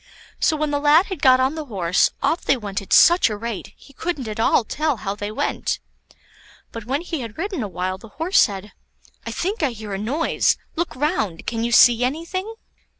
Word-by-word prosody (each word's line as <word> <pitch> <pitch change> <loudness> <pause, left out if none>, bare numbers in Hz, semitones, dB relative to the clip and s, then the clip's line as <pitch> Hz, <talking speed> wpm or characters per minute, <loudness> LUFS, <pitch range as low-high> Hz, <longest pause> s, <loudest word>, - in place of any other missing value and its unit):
So 315 - +2
when 300 -1 -1
the 285 - 0
lad 300 +5 +5
had 375 -7 -6
got 255 -1 +6
on 260 +2 +2
the 315 -1 -5
horse, 185 -8 +1
off 290 +5 +1
they 275 - +2
went 205 -4 -4
at 195 - -14
such 345 -5 +6
a 210 - -4
rate, 230 -1 -6
he 280 - -18
couldn't 295 -4 -4
at 215 0 -5
all 225 - +3
tell 300 +4 -1
how 195 -1 -3
they 205 0 -5
went. 215 - -2 0.9
But 230 -2 -8
when 275 +6 -1
he 340 -3 -4
had 230 -4 -7
ridden 370 -3 -3
awhile, 185 -2 -3
the 225 - -13
Horse 335 +5 +2
said, 200 0 +1 0.6
"I - - -3
think 395 +4 -3
I 295 - +2
hear 215 -2 -7
a 195 - -3
noise; 275 +10 +1 0.2
look 340 +2 -2
round! 255 - -1
can 230 0 -2
you 235 - -1
see 240 0 +6
anything?" 335 - -3
255 Hz, 210 wpm, -22 LUFS, 210-315 Hz, 0.9 s, got